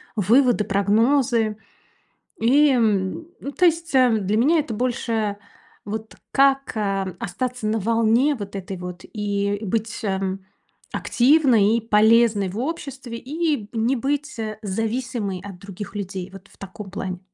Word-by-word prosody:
выводы, 230 +3 +3
прогнозы. 220 +3 +2 0.8
И 285 +6 +5
м, 220 - +1
ну 280 - -6
то 360 - +2
есть, 335 -1 +1
эм, 235 -6 +4
для 205 +3 +1
меня 305 +8 +4
это 285 -6 -3
больше 225 -3 -1 0.5
вот 220 +1 -6 0.2
как, 275 0 +3
эм, 195 -3 -1
остаться 250 +5 -3
на 220 +1 0
волне, 230 +6 +2
вот 200 -4 -7
этой 195 0 -5
вот 180 0 -8
и 205 -1 -2
и 215 - -7
быть, 225 +3 -2
эм, 190 -1 -2 0.5
активной 245 -6 +4
и - - -2
полезной 220 -1 +4
в 190 - -7
обществе. 270 -4 -5
И 305 +5 -1
б 210 -2 -11
не 230 +3 +1
быть, 285 +1 -2
э, 215 -1 -4
зависимой 225 -1 -3
от 195 -3 -9
других 200 +2 -9
людей, 190 -2 -5
вот 195 0 -13
в - - -22
таком 195 +1 -9
плане. 185 -2 -4
220 Hz, 150 wpm, -22 LUFS, 200-255 Hz, 0.8 s, И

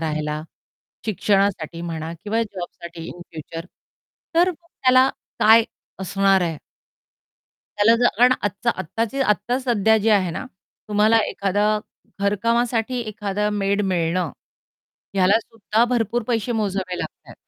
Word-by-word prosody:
राहायला, 155 -1 -2 0.6
शिक्षणासाठी 195 -5 0
म्हणा 165 -1 -4
किंवा 225 +2 +1
जॉबसाठी 175 -4 -8
इन 175 - -9
फ्युचर 165 +1 -8 0.7
तर 350 +2 +4
त्याला 265 -6 +2 0.3
काय 225 +1 +7 0.4
असणार 195 0 +2
आहे?" 165 -3 -1 1.2
त्याला 215 +3 +5
जर 240 -1 +2
अन 255 - +6
आजचा 205 +3 0
आत्ताची 230 - -3
आत्ता 240 +1 +1
सध्या 220 -4 +3
जी 220 +1 0
आहे 190 -4 +3
ना, 215 - -5 0.4
तुम्हाला 215 +2 +4
एखादं 205 +2 +1 0.4
घरकामासाठी 230 +4 +1
एखादं 210 -2 -2
मेड 200 0 0
मिळणं, 175 -3 0 0.8
ह्याला 190 +2 +4
सुद्धा 225 0 0
भरपूर 240 0 0
पैसे 235 0 0
मोजावे 195 -5 -2
लागतायत. - - -8
205 Hz, 115 wpm, -22 LUFS, 185-230 Hz, 1.2 s, काय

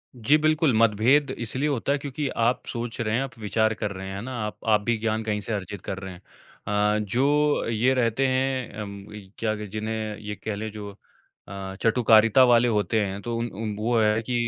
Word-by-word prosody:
जी, 130 +6 +3
बिल्कुल। 155 -3 +2
मतभेद 115 +6 +4
इसलिए 130 +6 -1
होता 140 -1 -1
है 140 - +2
क्योंकि 140 +1 -4 0.2
आप 125 - 0
सोच 120 -1 -5
रहे 110 0 0
हैं, 125 - +1
आप 130 -4 -8
विचार 110 +1 +1
कर 105 -1 -3
रहे 95 -1 -7
हैं, 95 - -6
है 100 - -5
ना? 130 +3 -6
आप 105 - -8
आप 105 -1 +4
भी 120 +2 0
ज्ञान 110 0 -1
कहीं 105 -1 -1
से 110 +3 -4
अर्जित 100 -1 -5
कर 95 - -5
रहे 95 -1 -7
हैं। 90 - -14 0.5
अ, 105 +1 +2
जो 145 +7 +2
ये 115 +4 +2
रहते 125 +1 +1
हैं 130 -4 -1
उम, 100 -1 -9 0.3
कह 110 -1 0
लें 105 -1 -6
जिन्हें 110 0 -4
ये 105 -1 -6
कहलें 105 +2 -5
जो 105 -1 -7 0.6
अ, 95 -1 -7
चटुकारिता 115 +1 +5
वाले 120 -1 +5
होते 110 0 +1
हैं 100 +1 -5
तो 120 +2 -4
उन 115 - -1
उ 110 +3 -6 0.2
वो 120 +1 +2
है 110 0 +2
कि 125 - -4
110 Hz, 210 wpm, -25 LUFS, 105-125 Hz, 0.6 s, चटुकारिता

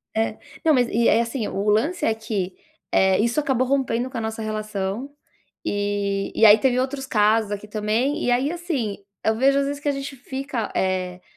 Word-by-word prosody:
É, 220 0 0 0.3
não, 315 - +6
mas 245 -2 +3
e 230 +1 +2
aí, 225 - +4
assim, 230 -1 -2
o 205 +2 -1
lance 285 +13 +1
é 225 - +3
que, 205 -5 -3 0.4
eh, 190 0 +4
isso 235 +6 +2
acabou 260 -4 +1
rompendo 260 -2 0
com 255 - -6
a - - -2
nossa 220 0 -4
relação. 215 +2 -3 0.5
E 205 -1 -1
e 225 - +5
aí 210 0 +9
teve 250 +2 +2
outros 270 +1 -2
casos 215 -3 +2
aqui 205 +1 -5
também. 220 +7 0
E 245 - +2
aí, 265 +5 +2
assim, 305 - -3 0.3
eu 220 0 +2
vejo, 275 +3 +3
às 280 - +1
vezes, 285 0 -4
que 290 - 0
a - - +3
gente 275 0 -5
fica, 265 -3 -4
eh, 185 -1 -1
225 Hz, 200 wpm, -23 LUFS, 210-270 Hz, 0.5 s, aí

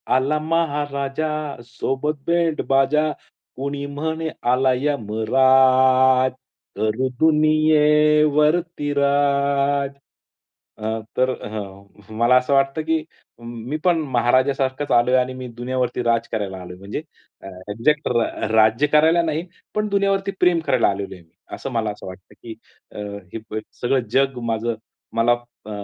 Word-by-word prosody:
आला 140 +4 +1
महाराजा 145 -2 -1 0.4
सोबत 135 +5 -3
बँडबाजा, 155 -3 +2 0.4
कुणी 140 +2 -4
म्हणे 160 +3 -3 0.2
आलाय 130 +1 +2
यमराज, 130 +1 +3 0.5
करू 110 +5 0
दुनियेवरती 150 0 +3
राज. 140 0 +1 0.9
अ, 110 +1 -3 0.2
तर 130 0 +3 0.2
हं. 100 +1 -9
मला 120 +2 +4
असं 125 +2 +1
वाटतं, 135 +3 +2
की 160 0 -1 0.4
मी 120 +5 -6
पण 175 -2 +3 0.2
महाराजासारखाच 130 +3 +1
आलोय 120 +1 +4
आणि 130 0 0
मी 130 -1 -7
दुनियावरती 125 0 -2
राज 115 0 +1
करायला 95 -4 -4
आलोय. 90 0 -10
म्हणजे 100 +9 -6 0.4
अ, - - -10 0.2
एक्झॅक्ट 150 +8 +1
रा 120 -2 -1
राज्य 110 +6 +4
करायला 160 +3 +4
नाही, 160 +1 -2 0.3
पण 210 0 0
दुनियावरती 195 -1 +1
प्रेम 175 -2 +3
करायला 125 -2 +3
आलेलो 100 -1 -4
आहे. 90 - -16 0.3
असं 135 - -6
मला 115 -3 -1
असं 105 - -10
वाटतं, 95 0 -12
की 115 - -7 0.4
अ, - - -12 0.4
हे 110 -1 -6 0.2
सगळं 125 -1 0
जग 135 -1 +1
माझं, 115 +1 -1 0.4
मला 115 +1 +3 0.3
अ, - - -9
135 Hz, 125 wpm, -21 LUFS, 120-150 Hz, 0.9 s, मला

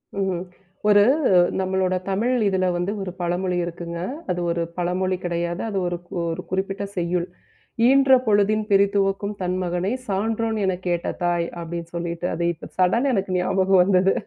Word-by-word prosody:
ம்ஹூம். 190 -3 -1 0.5
ஒரு 205 -1 +7 0.6
நம்மளோட 185 0 0
தமிழ் 220 +6 +1
இதுல 190 -1 +1
வந்து 175 +3 -1
ஒரு 190 -2 -4
பழமொழி 180 +1 -1
இருக்குங்க. 170 0 -6 0.3
அது 175 - -2
ஒரு 170 0 -1 0.2
பழமொழி 180 +1 0
கிடையாது. 170 0 -2
அது 200 - -3
ஒருக் 175 0 -6
ஒரு 165 +1 -3
குறிப்பிட்ட 195 +2 -2
செய்யுள். 175 0 0 0.6
"ஈன்ற 270 +1 +5 0.2
பொழுதின் 215 +1 +3
பிரித்துவக்கும் 200 0 +2
தன் 180 0 -1
மகனைச் 185 +8 -2
சான்றோன் 220 +3 -1
எனக் 185 -1 -2
கேட்ட 175 -1 -1 0.2
தாய்" 175 -1 +1
அப்படின்னு 170 0 -6
சொல்லிட்டு 170 0 -3
அது 170 - -2
இப்ப 165 - -11
சடன்னா 230 +9 +3
எனக்கு 195 -3 -1
ஞாபகம் 190 +1 +3
வந்தது. 190 0 +3
185 Hz, 145 wpm, -23 LUFS, 175-195 Hz, 0.6 s, ஒரு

